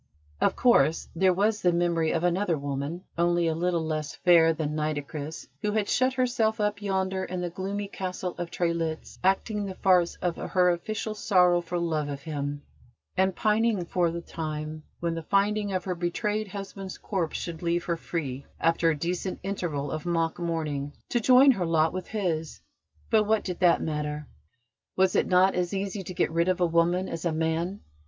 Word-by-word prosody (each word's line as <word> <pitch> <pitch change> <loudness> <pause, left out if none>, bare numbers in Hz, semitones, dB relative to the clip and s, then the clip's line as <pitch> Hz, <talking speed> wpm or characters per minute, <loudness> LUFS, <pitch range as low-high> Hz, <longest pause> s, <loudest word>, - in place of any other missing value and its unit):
Of - - +3
course, 165 - +3
there 185 +2 +4
was 205 +3 +1
the 180 - +4
memory 170 -2 +1
of 165 - 0
another 175 -1 +1
woman, 140 +5 -4 0.2
only 175 0 +3
a 165 - +1
little 170 0 0
less 155 -1 -3
fair 170 -2 +5
than 155 -2 -2
Nitocris, 150 0 -4
who 210 -1 0
had 215 -2 +1
shut 255 0 +2
herself 245 -4 +1
up 210 0 0
yonder 190 -1 -1
in 180 -1 -4
the 175 -1 -3
gloomy 200 +2 -3
Castle 185 -2 -4
of 175 -1 -3
Trelitz, 170 -2 -2
acting 205 +3 +1
the 190 -2 -5
farce 180 -3 +3
of 175 -2 -2
her 180 -1 +2
official 215 +5 -3
sorrow 180 -4 +3
for 175 +1 -4
love 160 -4 -1
of 140 -1 -6
him, 145 -2 -4 0.5
and 190 0 +2
pining 215 -3 +2
for 175 0 +1
the 170 +1 -4
time 155 -1 -5 0.2
when 170 -1 0
the 165 - -4
finding 205 +4 +1
of 185 -2 -1
her 185 - -2
betrayed 205 +5 -1
husband's 195 -1 -7
corpse 180 -6 -2
should 165 -2 -5
leave 170 0 0
her 170 - -1
free, 140 -6 -4
after 165 0 +3
a 155 - 0
decent 180 +4 -3
interval 165 -8 -3
of 155 -1 -4
mock 165 -1 0
mourning, 155 -4 -2 0.2
to 240 - +1
join 255 +4 +7
her 190 -8 -1
lot 160 0 +2
with 185 -1 -4
his: 170 -7 -2 0.5
but 215 -2 +4
what 215 0 +2
did 180 -2 -4
that 180 -2 +4
matter? 150 -1 -3 0.7
Was 190 -1 +3
it - - +3
not 185 +1 +4
as 180 +2 -1
easy 195 +1 -3
to 185 0 -7
get - - +1
rid 170 +1 +1
of 185 -1 +1
a 180 - +4
woman 170 +2 +2
as 165 -1 -5
a 170 - +1
man? 160 +4 -1
175 Hz, 190 wpm, -27 LUFS, 160-195 Hz, 0.7 s, join